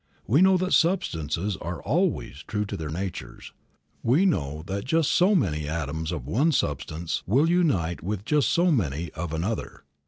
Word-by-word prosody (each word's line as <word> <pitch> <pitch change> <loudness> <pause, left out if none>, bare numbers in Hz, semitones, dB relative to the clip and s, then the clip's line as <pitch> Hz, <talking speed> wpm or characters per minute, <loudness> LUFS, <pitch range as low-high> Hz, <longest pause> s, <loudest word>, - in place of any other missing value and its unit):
We 135 - +3
know 190 0 +6
that 185 +1 -1
substances 95 - +1
are 85 0 -5
always 170 - -1
true 105 -2 -1
to - - -5
their 80 -2 -5
natures; 80 -8 -6 0.5
we 140 +12 +3
know 75 - 0
that 100 +2 -3
just 160 +2 +1
so 190 +4 +4
many 75 - 0
atoms 80 +1 -3
of 75 -8 -4
one 135 - +2
substance 80 - -2
will 135 - +3
unite 145 - +1
with 100 +3 -4
just 150 0 +2
so 175 +1 +3
many 85 - -1
of 80 +1 -5
another. 90 +8 -3
100 Hz, 165 wpm, -26 LUFS, -, 0.5 s, know